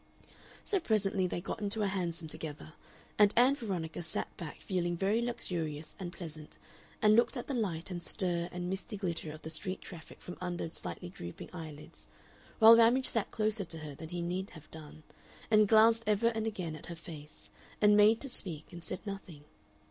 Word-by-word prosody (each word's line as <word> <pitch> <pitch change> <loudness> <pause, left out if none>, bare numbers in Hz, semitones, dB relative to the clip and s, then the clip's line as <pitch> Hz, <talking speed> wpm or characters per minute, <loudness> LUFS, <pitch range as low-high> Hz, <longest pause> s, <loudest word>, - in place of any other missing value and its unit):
So 400 - +2
presently 200 - +1
they 175 - -3
got 210 - -5
into 210 +1 +1
a - - +2
hansom 175 -4 -2
together, 155 0 -6 0.5
and 205 -1 +7
Ann 250 +3 +7
Veronica 185 - -3
sat 165 -1 -4
back 165 -4 -7
feeling 175 -2 -1
very 200 +5 +2
luxurious 165 -10 -3
and 180 -2 -4
pleasant, 160 -4 -9 0.5
and 210 0 +7
looked 235 +4 +3
at 240 - -4
the 280 - -3
light 190 -8 -2
and 175 -1 -4
stir 175 -2 -1
and 180 0 -4
misty 195 +4 -3
glitter 170 -5 -2
of 155 0 -11
the 160 - -5
street 185 +4 -1
traffic 170 -4 -10
from 180 - -9
under 175 -2 -2
slightly 85 - -6
drooping 85 -1 -8
eyelids, 155 -4 -9 0.5
while 225 0 +10
Ramage 240 +3 +5
sat 225 -3 0
closer 215 -1 0
to 165 -2 -4
her 155 -2 -7
than 160 +3 -9
he 175 0 -3
need 185 +3 -2
have 155 -3 -14
done, 155 -1 -10 0.5
and 215 -1 +6
glanced 225 +1 +6
ever 215 +2 +4
and 225 -1 -2
again 180 -7 -3
at - - -10
her 170 - -5
face, 155 -3 -11 0.3
and 210 0 +6
made 210 +2 +6
to 280 - -4
speak 175 -8 -3
and 175 -1 -8
said 185 - -4
nothing. 195 -7 -7
180 Hz, 190 wpm, -32 LUFS, 160-215 Hz, 0.5 s, while